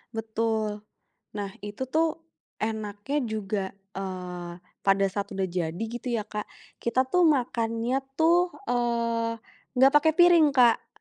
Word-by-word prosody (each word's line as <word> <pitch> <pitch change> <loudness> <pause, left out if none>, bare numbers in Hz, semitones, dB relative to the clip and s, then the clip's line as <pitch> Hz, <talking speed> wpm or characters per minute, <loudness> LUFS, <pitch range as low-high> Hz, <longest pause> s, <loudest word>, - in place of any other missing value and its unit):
betul. 220 -1 -1 0.6
Nah 200 -1 -3
itu 205 +5 -5
tuh 325 +1 +3 0.6
enaknya 215 +4 -3
juga, 215 -2 -2 0.4
eee, 180 -2 -5 0.3
pada 195 0 +4
saat 200 0 -3
udah 195 - 0
jadi 175 +1 -3
gitu 240 +1 -6
ya 215 - -1
Kak, 210 0 -5 0.3
kita 255 +2 +1
tuh 360 -2 +5
makannya 240 -2 +1 0.2
tuh, 330 +2 +4 0.3
eee, 235 -1 0 0.4
nggak 265 +2 +6
pakai 315 +2 +6
piring, 350 -3 +7
Kak. 240 -3 +5
225 Hz, 125 wpm, -27 LUFS, 205-255 Hz, 0.6 s, piring